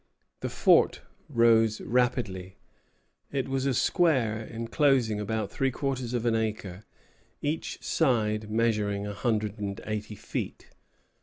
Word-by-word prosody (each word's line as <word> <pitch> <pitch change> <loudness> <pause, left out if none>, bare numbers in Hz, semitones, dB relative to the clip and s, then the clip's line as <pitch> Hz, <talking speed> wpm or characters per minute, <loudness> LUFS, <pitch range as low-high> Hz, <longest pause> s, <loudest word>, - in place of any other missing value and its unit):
The - - -3
fort - - +4 0.3
rose 115 -4 +4
rapidly. 115 -7 -1 0.7
It 135 -2 -1
was 135 0 -1
a 135 - +2
square 125 - +2
enclosing 115 -1 +2
about 105 -1 -2
three 135 -1 +1
quarters 130 -2 -2
of 120 -1 -1
an 115 - +3
acre, 105 -3 -3 0.6
each 150 +3 -3
side 110 -7 +1
measuring 105 -3 +1
a 105 - -4
hundred 105 -1 -1
and 100 +1 -4
eighty 105 0 -4
feet. - - -5
115 Hz, 125 wpm, -28 LUFS, 105-125 Hz, 0.7 s, fort